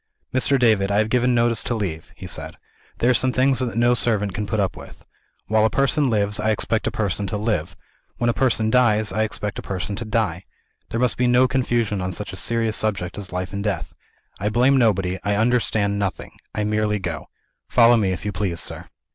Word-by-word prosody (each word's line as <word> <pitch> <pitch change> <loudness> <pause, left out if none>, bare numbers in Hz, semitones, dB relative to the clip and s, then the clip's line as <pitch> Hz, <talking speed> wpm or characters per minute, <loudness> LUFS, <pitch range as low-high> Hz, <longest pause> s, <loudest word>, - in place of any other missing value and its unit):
"Mr. 130 +2 +3
David, 110 -6 +3
I 100 - +1
have 110 +1 +2
given 125 0 +2
notice 115 -1 +2
to 120 - -2
leave," 90 -7 -4
he - - -10
said. - - -7 0.4
"There 120 - +3
are - - +4
some 130 +2 +2
things 130 +1 +2
that 125 -3 -2
no 120 +1 +4
servant 105 -5 0
can 105 +1 -3
put 110 - -1
up 95 -2 0
with. - - -13 0.4
While 110 0 +2
a 110 - +4
person 140 +2 +1
lives, 105 -1 0
I 110 +1 0
expect 110 +1 0
a - - 0
person 100 -1 -2
to 105 - -2
live. 105 -7 -2 0.4
When 120 - 0
a 120 - +3
person 115 -4 +1
dies, 110 -5 +3
I 110 +3 -1
expect 105 -1 -3
a - - -5
person 95 +1 -4
to 115 - -3
die. 105 -5 -1 0.4
There 115 - -2
must 125 -1 +1
be 125 - +2
no 125 +1 +5
confusion 120 -6 0
on 90 0 -2
such 100 +2 -5
a - - -5
serious 115 +3 -1
subject 100 -5 -1
as 100 - -8
life 90 +1 -4
and 100 0 -3
death. 105 -2 -3 0.5
I 105 - 0
blame 125 +5 +3
nobody 95 -7 +2
I 100 0 0
understand 110 -3 +1
nothing 100 -2 -3 0.2
I 105 - 0
merely 105 0 0
go. 90 -5 -5 0.4
Follow 120 0 +6
me, 100 -5 +1
if 90 +1 -5
you 105 - -1
please, 95 -5 -2
sir." - - -5
110 Hz, 220 wpm, -22 LUFS, 100-120 Hz, 0.5 s, Follow